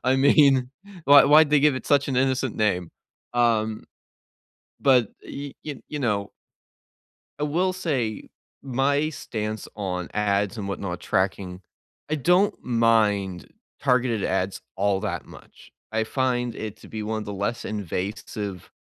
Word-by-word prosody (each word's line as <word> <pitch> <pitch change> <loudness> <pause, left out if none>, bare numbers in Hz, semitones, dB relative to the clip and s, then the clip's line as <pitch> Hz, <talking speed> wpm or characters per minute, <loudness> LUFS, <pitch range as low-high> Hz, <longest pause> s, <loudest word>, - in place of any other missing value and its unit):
I 130 +1 +3
mean, 135 -2 +5 0.3
why 140 +1 +8
why 155 +2 +7
did 145 - -8
they 150 -1 +5
give 145 -1 +4
it 130 - -5
such 145 -1 +3
an 130 - -1
innocent 130 -1 +1
name? 90 -6 0 0.4
Um, 110 -2 +1 1.0
but, 125 -6 +4
y 140 -1 -7
y 145 -4 -6
you 150 - -4
know 105 -6 -1 1.1
I 150 - -1
will 180 +5 +1
say 135 - -2 0.3
my 140 +3 +1
stance 110 -7 -5
on 90 -4 -3
ads 105 +1 0
and 100 -2 -4
whatnot 95 -2 -4
tracking, 95 -1 -1 0.5
I 155 - +1
don't 180 +7 +3
mind 110 -6 +2 0.3
targeted 125 -5 +2
ads 95 0 -1 0.2
all 100 -1 +1
that - - -3
much. - - -16 0.2
I 110 0 0
find 125 -2 -1
it 110 -1 -6
to - - -14
be 110 -1 -5
one 110 +1 -2
of 105 - -7
the 105 - -5
less 100 +4 -3
invasive 100 -1 -5
115 Hz, 145 wpm, -24 LUFS, 100-135 Hz, 1.1 s, why